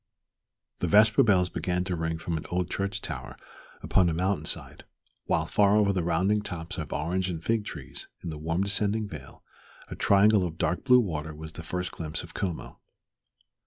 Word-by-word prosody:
The 90 Hz, -, 0 dB
vesper 105 Hz, +4 st, +6 dB
bells 95 Hz, -5 st, +4 dB
began 90 Hz, 0 st, -1 dB
to 90 Hz, -1 st, -2 dB
ring 80 Hz, 0 st, -2 dB
from 85 Hz, +1 st, -3 dB
an 80 Hz, -, -3 dB
old 90 Hz, 0 st, -1 dB
church 100 Hz, 0 st, -2 dB
tower -, -, -6 dB, 0.5 s
upon 90 Hz, -2 st, +3 dB
a 80 Hz, -, -1 dB
mountain 90 Hz, -2 st, 0 dB
side, -, -, -3 dB, 0.4 s
while -, -, +1 dB
far 100 Hz, 0 st, +3 dB
over 100 Hz, -2 st, +3 dB
the 95 Hz, -, 0 dB
rounding 95 Hz, +5 st, +2 dB
tops 90 Hz, -1 st, -6 dB
of 75 Hz, -, -5 dB
orange 90 Hz, +5 st, -1 dB
and 85 Hz, -2 st, -5 dB
fig 115 Hz, -2 st, 0 dB
trees 75 Hz, -9 st, -7 dB, 0.2 s
in 85 Hz, -, -4 dB
the 75 Hz, -, -6 dB
warm 80 Hz, +4 st, 0 dB
descending 105 Hz, +2 st, +1 dB
vale 75 Hz, -8 st, -11 dB, 0.5 s
a -, -, -6 dB
triangle 100 Hz, 0 st, +4 dB
of 85 Hz, -2 st, -4 dB
dark 85 Hz, +2 st, 0 dB
blue 125 Hz, -1 st, +7 dB
water 80 Hz, -8 st, -3 dB
was 80 Hz, +1 st, -8 dB
the -, -, -7 dB
first 90 Hz, +2 st, -3 dB
glimpse 80 Hz, -2 st, -4 dB
of -, -, -12 dB
Como. 90 Hz, -4 st, -4 dB
90 Hz, 190 wpm, -28 LUFS, 80-100 Hz, 0.5 s, blue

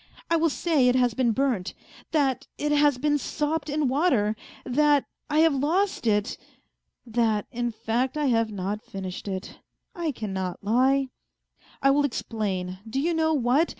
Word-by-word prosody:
I -, -, +5 dB
will 330 Hz, 0 st, +3 dB
say 295 Hz, -3 st, +2 dB
it 250 Hz, -, +4 dB
has 245 Hz, -2 st, +3 dB
been 245 Hz, -1 st, +2 dB
burnt, 230 Hz, -7 st, -1 dB, 0.4 s
that 275 Hz, -5 st, +1 dB
it 295 Hz, 0 st, -1 dB
has 290 Hz, -2 st, +4 dB
been 295 Hz, +2 st, +1 dB
sopped 300 Hz, +2 st, -2 dB
in 295 Hz, -1 st, +1 dB
water, 255 Hz, -7 st, +2 dB, 0.3 s
that 290 Hz, +2 st, +3 dB, 0.2 s
I 305 Hz, +1 st, +3 dB
have 325 Hz, -2 st, +5 dB
lost 315 Hz, -, 0 dB
it.... 210 Hz, +1 st, +1 dB, 0.7 s
That, 225 Hz, -3 st, +1 dB
in 240 Hz, -1 st, -1 dB
fact, 240 Hz, +5 st, -1 dB
I 300 Hz, -, 0 dB
have 230 Hz, -4 st, +2 dB
not 200 Hz, +1 st, -3 dB
finished 190 Hz, 0 st, -7 dB
it; 190 Hz, -1 st, -5 dB, 0.3 s
I 335 Hz, -3 st, -2 dB
cannot 190 Hz, -7 st, -4 dB
lie. 260 Hz, +5 st, +2 dB, 0.7 s
I 275 Hz, -, +6 dB
will 290 Hz, +1 st, +3 dB
explain, 195 Hz, -8 st, -3 dB
do 265 Hz, +4 st, -1 dB
you 335 Hz, +5 st, +1 dB
know, 320 Hz, -1 st, +2 dB
what 270 Hz, +5 st, +2 dB
260 Hz, 160 wpm, -26 LUFS, 220-295 Hz, 0.7 s, I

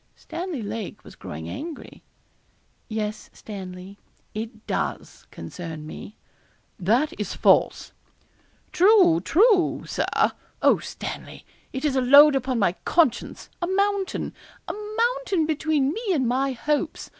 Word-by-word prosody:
Stanley 340 Hz, -8 st, -5 dB
Lake 210 Hz, 0 st, -6 dB
was -, -, -13 dB
growing 80 Hz, +2 st, -8 dB
angry. 315 Hz, -, -8 dB, 0.9 s
'Yes, 215 Hz, -1 st, -4 dB
Stanley, 190 Hz, -1 st, -9 dB, 0.3 s
it 220 Hz, 0 st, -7 dB
does -, -, -4 dB
concern 160 Hz, -3 st, -8 dB
me.' 200 Hz, +6 st, -9 dB, 0.6 s
'That 240 Hz, -, +2 dB
is -, -, -3 dB
false.' -, -, +3 dB, 0.8 s
'True, 365 Hz, -3 st, +5 dB
true, 395 Hz, -1 st, +3 dB
Sir. -, -, +1 dB, 0.3 s
Oh, -, -, +4 dB
Stanley, -, -, -7 dB, 0.3 s
it 265 Hz, +3 st, -4 dB
is 280 Hz, -3 st, +1 dB
a 260 Hz, -, +3 dB
load 285 Hz, +3 st, +8 dB
upon 260 Hz, -1 st, 0 dB
my 200 Hz, -5 st, +3 dB
conscience 300 Hz, -9 st, +1 dB
a 345 Hz, -, 0 dB
mountain 395 Hz, 0 st, 0 dB, 0.3 s
a -, -, -3 dB, 0.2 s
mountain 470 Hz, -8 st, +1 dB
between 305 Hz, -2 st, +1 dB
me 450 Hz, -, -5 dB
and 260 Hz, -5 st, +1 dB
my 265 Hz, +3 st, +1 dB
hopes. 300 Hz, +5 st, -2 dB
275 Hz, 120 wpm, -24 LUFS, 215-345 Hz, 0.9 s, load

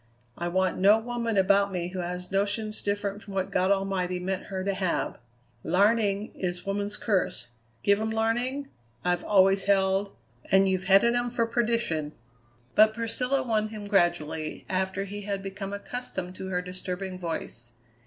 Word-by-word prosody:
I 175 Hz, -, -3 dB
want 185 Hz, +1 st, +1 dB
no 200 Hz, +3 st, +7 dB
woman 230 Hz, -1 st, -2 dB
about 200 Hz, +1 st, +4 dB
me 175 Hz, -2 st, -2 dB
who 185 Hz, 0 st, -5 dB
has 180 Hz, +1 st, -4 dB
notions 205 Hz, +2 st, 0 dB
different 205 Hz, 0 st, -2 dB
from 200 Hz, -1 st, -9 dB
what 190 Hz, -1 st, -1 dB
God 185 Hz, +1 st, +2 dB
Almighty 195 Hz, -2 st, 0 dB
meant 190 Hz, +1 st, -3 dB
her 190 Hz, -1 st, -4 dB
to 200 Hz, +1 st, 0 dB
have. 185 Hz, -2 st, -1 dB, 0.4 s
Larning 205 Hz, +3 st, +2 dB
is 180 Hz, -1 st, -4 dB
woman's 200 Hz, +1 st, -2 dB
curse. 195 Hz, -, 0 dB, 0.3 s
Give 200 Hz, +1 st, +4 dB
'em 220 Hz, -, -1 dB
larning, 240 Hz, +5 st, -1 dB, 0.4 s
I've 180 Hz, 0 st, +1 dB
always 195 Hz, -1 st, +4 dB
held, 195 Hz, 0 st, +2 dB, 0.4 s
and 195 Hz, 0 st, +5 dB
you've 190 Hz, 0 st, 0 dB
headed 195 Hz, +5 st, +5 dB
'em 240 Hz, 0 st, 0 dB
for 235 Hz, -1 st, +1 dB
perdition." 230 Hz, -10 st, 0 dB, 0.6 s
But 215 Hz, +1 st, +6 dB
Priscilla 250 Hz, +4 st, 0 dB
won 220 Hz, -3 st, +1 dB
him 215 Hz, -1 st, -7 dB
gradually, 175 Hz, -5 st, 0 dB
after 190 Hz, +1 st, -1 dB
he 205 Hz, +1 st, -6 dB
had 200 Hz, -1 st, -3 dB
become 195 Hz, 0 st, -5 dB
accustomed 200 Hz, -3 st, -5 dB
to 190 Hz, -, -5 dB
her 180 Hz, -1 st, -1 dB
disturbing 185 Hz, +1 st, -4 dB
voice. 120 Hz, -8 st, -5 dB
195 Hz, 160 wpm, -27 LUFS, 185-215 Hz, 0.6 s, no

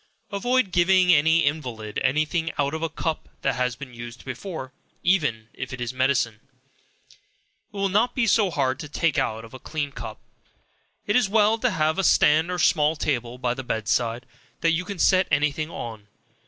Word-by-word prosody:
Avoid 235 Hz, +1 st, +1 dB
giving 180 Hz, +1 st, +4 dB
an 150 Hz, 0 st, +4 dB
invalid 145 Hz, -10 st, 0 dB
any 145 Hz, +5 st, +2 dB
thing 165 Hz, +1 st, -2 dB
out 140 Hz, 0 st, 0 dB
of 160 Hz, -, -3 dB
a 165 Hz, -, -1 dB
cup 160 Hz, 0 st, -4 dB
that 135 Hz, -, +2 dB
has 125 Hz, -1 st, -1 dB
been 125 Hz, -1 st, -10 dB
used 120 Hz, +1 st, -9 dB
before; 160 Hz, -9 st, -6 dB, 0.3 s
even 145 Hz, -, +1 dB
if 130 Hz, -1 st, -6 dB
it 130 Hz, -, -6 dB
is 120 Hz, 0 st, -3 dB
medicine, 130 Hz, -4 st, +1 dB
it 130 Hz, 0 st, -34 dB
will 195 Hz, 0 st, +1 dB
not 215 Hz, +6 st, +1 dB
be 255 Hz, -, +2 dB
so 210 Hz, -2 st, +3 dB
hard 135 Hz, -4 st, 0 dB
to 150 Hz, -3 st, -7 dB
take 155 Hz, 0 st, +1 dB
out 110 Hz, +1 st, -2 dB
of 115 Hz, -, -15 dB
a 130 Hz, -, -9 dB
clean 145 Hz, +1 st, -4 dB
cup. 115 Hz, -4 st, -8 dB, 0.9 s
It 205 Hz, -, 0 dB
is 250 Hz, -6 st, +3 dB
well 215 Hz, +1 st, +3 dB
to 250 Hz, -, +2 dB
have 160 Hz, -3 st, 0 dB
a -, -, +1 dB
stand 155 Hz, -1 st, +4 dB
or 180 Hz, -, -2 dB
small 155 Hz, -2 st, +3 dB
table 125 Hz, -5 st, -2 dB
by 125 Hz, -1 st, -1 dB
the 135 Hz, +1 st, -6 dB
bed 110 Hz, -3 st, -3 dB
side, 120 Hz, +1 st, 0 dB, 0.4 s
that 165 Hz, -, +3 dB
you 165 Hz, +2 st, -1 dB
can 200 Hz, 0 st, -6 dB
set 185 Hz, +1 st, +4 dB
any 150 Hz, 0 st, +2 dB
thing 155 Hz, +2 st, -4 dB
on. 110 Hz, -9 st, -7 dB
150 Hz, 195 wpm, -24 LUFS, 125-180 Hz, 0.9 s, giving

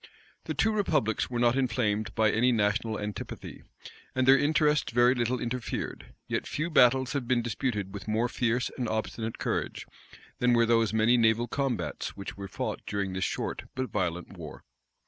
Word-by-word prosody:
The -, -, -3 dB
two 220 Hz, -, +2 dB
republics 155 Hz, -, 0 dB
were 120 Hz, -, -3 dB
not 120 Hz, 0 st, +3 dB
inflamed 110 Hz, -6 st, 0 dB
by 110 Hz, -1 st, +3 dB
any 125 Hz, +3 st, +3 dB
national 110 Hz, 0 st, +1 dB
antipathy, 105 Hz, 0 st, -6 dB, 0.5 s
and 130 Hz, 0 st, +1 dB
their 135 Hz, -, +9 dB
interests 150 Hz, -2 st, +2 dB
very 120 Hz, +1 st, +5 dB
little 125 Hz, 0 st, 0 dB
interfered: 120 Hz, 0 st, -4 dB
yet -, -, -2 dB
few 160 Hz, +3 st, -2 dB
battles 130 Hz, -2 st, +4 dB
have 135 Hz, -4 st, -2 dB
been 120 Hz, -1 st, +2 dB
disputed 105 Hz, -4 st, -2 dB
with 100 Hz, 0 st, -7 dB
more 110 Hz, +3 st, +1 dB
fierce 125 Hz, 0 st, 0 dB
and 120 Hz, -3 st, -1 dB
obstinate 110 Hz, +1 st, -3 dB
courage, -, -, -2 dB, 0.5 s
than 125 Hz, 0 st, +3 dB
were 115 Hz, 0 st, +4 dB
those 115 Hz, -1 st, +3 dB
many 110 Hz, +2 st, +4 dB
naval 115 Hz, +1 st, +3 dB
combats 135 Hz, -7 st, -3 dB
which 100 Hz, -, -6 dB
were 100 Hz, 0 st, -7 dB
fought 110 Hz, +2 st, -4 dB
during 100 Hz, -2 st, -2 dB
this 95 Hz, +1 st, -2 dB
short -, -, -3 dB
but 130 Hz, -1 st, -3 dB
violent 90 Hz, -4 st, -2 dB
war. -, -, -9 dB
120 Hz, 170 wpm, -28 LUFS, 110-125 Hz, 0.5 s, their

